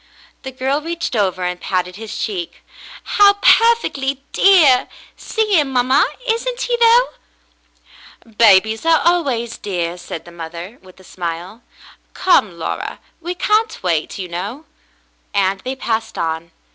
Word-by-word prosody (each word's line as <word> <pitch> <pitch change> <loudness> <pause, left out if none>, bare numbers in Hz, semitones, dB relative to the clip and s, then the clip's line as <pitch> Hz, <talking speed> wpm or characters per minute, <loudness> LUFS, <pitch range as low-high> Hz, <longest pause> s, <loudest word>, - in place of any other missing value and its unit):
The 265 - -6
girl 265 +3 -1
reached 335 -4 -4
over 185 -4 0
and 180 0 -3
patted 180 -1 -2
his 220 +1 -7
cheek. 185 -6 -5 0.4
"How 405 -1 +5
perfectly 400 - +2
dear. 320 -10 +5 0.3
See 425 -5 0
him, 285 -3 -1
mamma. 255 +1 +3 0.2
Isn't 485 +2 -1
he, - - 0
though? 475 +1 +5 0.6
" 225 -2 -24
"Babies 220 0 +5
are 325 -1 +4
always 265 -10 0
dear," 175 -3 -3
said 165 - -8
the 175 - -12
mother, 170 +6 -9
with 185 0 -18
a - - -16
smile. 175 +5 -6 0.5
"Come, 215 - +2
Laura, 165 - -4 0.2
we 350 +2 -4
can't 430 +5 0
wait, 165 -4 -1
you 190 -2 -5
know," 200 - -6 0.7
and 195 0 +1
they 255 +6 -5
passed 225 -3 -3
on. 160 0 -3
230 Hz, 140 wpm, -18 LUFS, -, 0.7 s, How